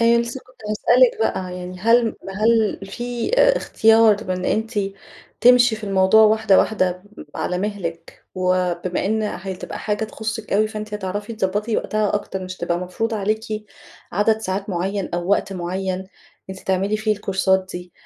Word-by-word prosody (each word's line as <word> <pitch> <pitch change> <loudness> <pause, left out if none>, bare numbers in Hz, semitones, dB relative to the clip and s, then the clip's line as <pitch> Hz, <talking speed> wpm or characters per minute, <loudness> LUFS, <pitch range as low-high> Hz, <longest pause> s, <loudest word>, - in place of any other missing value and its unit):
أيوه، 235 0 +5
لسه 235 +2 -5
كنت 255 0 -22
هاسألِك 240 +4 +4
بقى، 185 -4 -1
يعني 180 0 -7
هل 230 +2 +3 0.2
هل 220 -2 +2
في 240 +3 -4
آآ - - +5
اختيار 220 -1 +4
من 185 0 -2
أنتِ 220 +4 -1 0.7
تمشي 245 -2 +6
في 215 - -8
الموضوع 195 +2 +5
واحدة 215 -2 +4
واحدة، 185 -4 +1 0.3
على 180 - -2
مهلِك، 180 -5 -5
وبما 180 0 0
إن 220 +1 0
هتبقى 190 -1 -5
حاجة 210 +1 -2
تخصِك 220 0 -5
أوي، 215 +2 +3
فأنتِ 215 -1 -6
هتعرفي 205 +2 -4
تظبطي 210 +1 -1
وقتها 215 -1 0
أكتر 190 -2 -3
مش 185 0 -7
هتبقى 175 0 -1
مفروضة 220 +5 -3
عليكِ 215 +1 -2 0.5
عدد 210 +4 +2
ساعات 195 -1 -3
معين 190 +2 -2
أو 175 +1 -3
وقت 200 - +1
معين، 185 +1 -3 0.4
أنتِ 190 0 -8
تعملي 195 +3 0
فيه 215 0 0
الكورسات 190 -2 +1
دي، 180 -1 -8
205 Hz, 155 wpm, -21 LUFS, 185-220 Hz, 0.7 s, تمشي